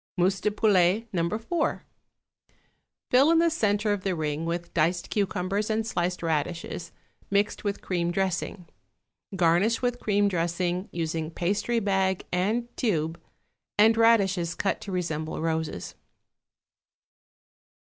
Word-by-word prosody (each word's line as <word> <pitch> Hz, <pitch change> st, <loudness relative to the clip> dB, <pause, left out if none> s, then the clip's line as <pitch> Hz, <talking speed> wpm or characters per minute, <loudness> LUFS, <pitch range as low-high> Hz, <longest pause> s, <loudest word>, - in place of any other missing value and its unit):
=Mousse 185 Hz, +1 st, +2 dB
de -, -, +2 dB
Poulet, 205 Hz, 0 st, +3 dB
No. 170 Hz, -2 st, +1 dB
4.= 225 Hz, -, -1 dB, 1.3 s
Fill 265 Hz, +4 st, +6 dB
in 330 Hz, -, +5 dB
the 335 Hz, 0 st, +4 dB
centre 210 Hz, -7 st, +1 dB
of 205 Hz, -, -3 dB
the 185 Hz, -1 st, -1 dB
ring 155 Hz, 0 st, -2 dB
with 170 Hz, 0 st, -4 dB
diced 170 Hz, +2 st, 0 dB
cucumbers 200 Hz, +1 st, -1 dB
and 220 Hz, 0 st, 0 dB
sliced 180 Hz, -5 st, -2 dB
radishes, 165 Hz, +1 st, -2 dB, 0.4 s
mixed 200 Hz, +1 st, +1 dB
with 205 Hz, -1 st, -3 dB
cream 175 Hz, -2 st, -1 dB
dressing. 185 Hz, 0 st, -2 dB, 0.7 s
Garnish 185 Hz, +7 st, +2 dB
with 245 Hz, 0 st, 0 dB
cream 205 Hz, -1 st, +2 dB
dressing, 175 Hz, +1 st, -1 dB
using 160 Hz, -1 st, -2 dB
pastry 200 Hz, +8 st, 0 dB
bag 195 Hz, -3 st, 0 dB
and 215 Hz, +7 st, 0 dB
tube, 165 Hz, -7 st, -1 dB, 0.6 s
and 220 Hz, +2 st, +6 dB
radishes 195 Hz, -7 st, +3 dB
cut 195 Hz, -, -1 dB
to 200 Hz, -, -7 dB
resemble 160 Hz, -4 st, -3 dB
roses. 160 Hz, -, -2 dB
185 Hz, 125 wpm, -27 LUFS, 170-210 Hz, 1.3 s, Fill